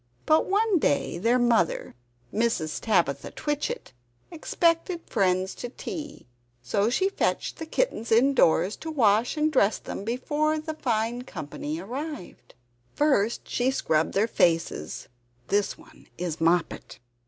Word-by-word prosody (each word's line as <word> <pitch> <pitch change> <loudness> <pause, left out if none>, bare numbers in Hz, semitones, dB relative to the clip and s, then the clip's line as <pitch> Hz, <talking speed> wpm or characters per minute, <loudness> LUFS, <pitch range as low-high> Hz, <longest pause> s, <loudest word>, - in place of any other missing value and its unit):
But 310 +1 +3
one 410 -1 +2
day 145 - 0
their 230 +6 +3
mother 235 -7 +1 0.4
Mrs. 220 -9 0
Tabitha 170 -11 +1
Twitchit 295 - -3 0.4
expected 335 +1 0
friends 185 -3 +1
to 245 - -6
tea; 295 +3 -7 0.4
so 200 - +1
she 375 +10 +2
fetched 395 - -1
the 320 - -5
kittens 275 - -1
indoors, 225 -6 +4
to 320 - -7
wash 235 -4 +2
and 305 0 +1
dress 215 -5 +3
them, - - -7
before 295 +7 0
the 315 +1 -5
fine 240 -4 -1
company 155 - -6
arrived. 230 - -7 0.4
First 235 -7 +1
she 245 +1 +1
scrubbed 160 -12 0
their 205 +3 +3
faces 165 - 0 0.4
(this 205 0 +1
one - - -18
is 170 -3 -4
Moppet). 170 +1 0
235 Hz, 130 wpm, -26 LUFS, 185-305 Hz, 0.4 s, indoors